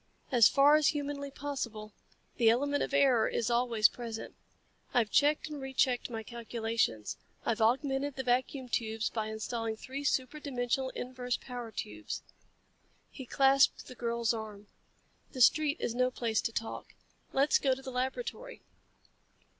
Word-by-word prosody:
"As 240 Hz, -4 st, +7 dB
far 285 Hz, +2 st, +6 dB
as 305 Hz, -2 st, +3 dB
humanly 285 Hz, -2 st, -2 dB
possible. 235 Hz, -7 st, -5 dB, 0.4 s
The 230 Hz, -2 st, +5 dB
element 285 Hz, +5 st, +1 dB
of -, -, -2 dB
error 275 Hz, -5 st, +4 dB
is 230 Hz, 0 st, -1 dB
always 235 Hz, -3 st, +4 dB
present. 230 Hz, -2 st, -7 dB, 0.6 s
I've 230 Hz, -4 st, +2 dB
checked 295 Hz, +2 st, +3 dB
and 300 Hz, -2 st, -7 dB
re 265 Hz, 0 st, -7 dB
checked 255 Hz, -2 st, +2 dB
my 225 Hz, -2 st, -5 dB
calculations. 225 Hz, -, -2 dB, 0.3 s
I've 230 Hz, 0 st, 0 dB
augmented 270 Hz, +4 st, +1 dB
the 265 Hz, -, -3 dB
vacuum 255 Hz, +1 st, 0 dB
tubes 225 Hz, -2 st, -1 dB
by 220 Hz, -2 st, -2 dB
installing 220 Hz, +1 st, -3 dB
three 270 Hz, +5 st, -6 dB
super 275 Hz, +1 st, 0 dB
dimensional 260 Hz, -2 st, -1 dB
inverse 250 Hz, -1 st, -3 dB
power 245 Hz, -3 st, -7 dB
tubes." 305 Hz, +9 st, -6 dB, 0.9 s
He 265 Hz, -3 st, -9 dB
clasped 275 Hz, +1 st, +4 dB
the -, -, -10 dB
girl's 235 Hz, -1 st, -1 dB
arm. 215 Hz, -2 st, -7 dB, 0.7 s
"The 255 Hz, -, -3 dB
street 295 Hz, +4 st, +5 dB
is 230 Hz, -, -2 dB
no 255 Hz, +1 st, +2 dB
place 230 Hz, -3 st, -1 dB
to -, -, -2 dB
talk. 225 Hz, 0 st, -5 dB, 0.4 s
Let's 275 Hz, +2 st, +3 dB
go 265 Hz, -2 st, +2 dB
to 270 Hz, -, -11 dB
the 265 Hz, -, -6 dB
laboratory." 370 Hz, -, -4 dB
250 Hz, 150 wpm, -31 LUFS, 230-275 Hz, 0.9 s, As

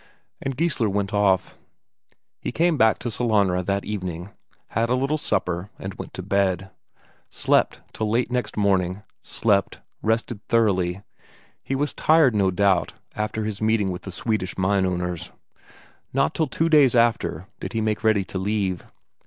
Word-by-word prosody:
And 135 Hz, -1 st, -3 dB
Geissler 150 Hz, -10 st, +1 dB
went 100 Hz, +1 st, -1 dB
off. 95 Hz, -2 st, +2 dB, 0.8 s
He -, -, -4 dB
came 170 Hz, +1 st, +2 dB
back 110 Hz, -5 st, +4 dB
to 120 Hz, -, -4 dB
Sellanraa 100 Hz, -6 st, +1 dB
that 100 Hz, 0 st, 0 dB
evening, 90 Hz, -3 st, -5 dB, 0.4 s
had 115 Hz, +2 st, 0 dB
a 125 Hz, -, +3 dB
little 135 Hz, +4 st, 0 dB
supper, 90 Hz, -6 st, -1 dB
and 95 Hz, 0 st, -6 dB
went -, -, -9 dB
to -, -, -5 dB
bed. 95 Hz, -1 st, 0 dB, 0.6 s
Slept -, -, +1 dB
till 110 Hz, -1 st, -2 dB
late 120 Hz, +3 st, +1 dB
next 125 Hz, -3 st, -2 dB
morning, 95 Hz, -1 st, +1 dB, 0.2 s
slept, 100 Hz, -3 st, 0 dB, 0.2 s
rested 115 Hz, -1 st, -1 dB
thoroughly; 100 Hz, -5 st, +1 dB, 0.6 s
he 135 Hz, -, -3 dB
was 145 Hz, +2 st, -1 dB
tired, 155 Hz, -6 st, +4 dB
no 100 Hz, -3 st, +2 dB
doubt, 95 Hz, -1 st, +2 dB, 0.2 s
after 105 Hz, 0 st, -2 dB
his 105 Hz, -2 st, -4 dB
meeting 110 Hz, -3 st, +2 dB
with 90 Hz, +1 st, -5 dB
the 95 Hz, -, -7 dB
Swedish 110 Hz, -1 st, -2 dB
mine 95 Hz, 0 st, +2 dB
owners. 90 Hz, -2 st, -3 dB, 0.8 s
Not 135 Hz, +1 st, +2 dB
till 160 Hz, -, 0 dB
two 160 Hz, +5 st, 0 dB
days 145 Hz, -6 st, +5 dB
after 115 Hz, -7 st, +2 dB
did -, -, -6 dB
he 115 Hz, -, 0 dB
make 110 Hz, 0 st, -1 dB
ready 110 Hz, -3 st, +3 dB
to 95 Hz, -, -5 dB
leave. 95 Hz, -2 st, -1 dB
105 Hz, 160 wpm, -24 LUFS, 95-115 Hz, 0.8 s, days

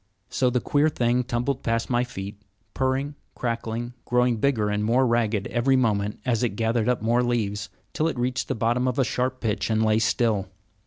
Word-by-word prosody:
So 130 Hz, -, +2 dB
the 125 Hz, 0 st, +1 dB
queer 145 Hz, +5 st, +2 dB
thing 125 Hz, -3 st, +1 dB
tumbled 125 Hz, +2 st, -2 dB
past 115 Hz, 0 st, -1 dB
my 120 Hz, -1 st, +1 dB
feet, 100 Hz, -3 st, -7 dB, 0.3 s
purring, 135 Hz, +2 st, 0 dB, 0.2 s
crackling, 115 Hz, 0 st, -3 dB
growing 125 Hz, -1 st, +2 dB
bigger 110 Hz, -3 st, +1 dB
and 105 Hz, 0 st, 0 dB
more 120 Hz, +4 st, +3 dB
ragged 115 Hz, -4 st, +1 dB
every 130 Hz, +3 st, +2 dB
moment 105 Hz, -5 st, +1 dB
as 120 Hz, -4 st, +1 dB
it 120 Hz, -5 st, 0 dB
gathered 115 Hz, +1 st, +1 dB
up 120 Hz, -4 st, 0 dB
more 120 Hz, +2 st, +3 dB
leaves, 110 Hz, -5 st, -1 dB, 0.2 s
till 155 Hz, -, +1 dB
it 160 Hz, -, -2 dB
reached 125 Hz, +1 st, -1 dB
the -, -, -1 dB
bottom 120 Hz, +3 st, +1 dB
of 125 Hz, -, -1 dB
a 135 Hz, -, +4 dB
sharp 130 Hz, +1 st, -2 dB
pitch 110 Hz, -2 st, -1 dB
and 110 Hz, 0 st, +2 dB
lay 110 Hz, 0 st, +3 dB
still. 110 Hz, -3 st, +1 dB
120 Hz, 195 wpm, -25 LUFS, 110-125 Hz, 0.3 s, a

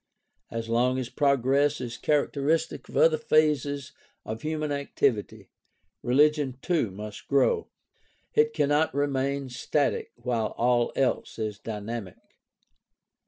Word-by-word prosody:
As 115 Hz, 0 st, -4 dB
long 125 Hz, +3 st, +2 dB
as 130 Hz, -2 st, -3 dB
progress 140 Hz, +1 st, +2 dB
is 120 Hz, -2 st, -5 dB
characteristic 150 Hz, +4 st, 0 dB
of -, -, -5 dB
other 160 Hz, -1 st, +5 dB
phases 145 Hz, -3 st, +1 dB, 0.3 s
of 110 Hz, +1 st, -5 dB
human 155 Hz, -1 st, -2 dB
activity, 140 Hz, -5 st, -1 dB, 0.5 s
religion 145 Hz, 0 st, +2 dB
too 165 Hz, -, +1 dB
must 105 Hz, +2 st, -9 dB
grow. 435 Hz, -, +2 dB, 0.7 s
It 450 Hz, +1 st, +4 dB
cannot 145 Hz, -, +1 dB
remain 140 Hz, -1 st, -1 dB
static 130 Hz, +3 st, -1 dB
while 120 Hz, -3 st, -2 dB
all 120 Hz, 0 st, +2 dB
else 135 Hz, -, 0 dB
is 110 Hz, -2 st, -3 dB
dynamic. 110 Hz, -2 st, -7 dB
135 Hz, 115 wpm, -27 LUFS, 120-150 Hz, 0.7 s, other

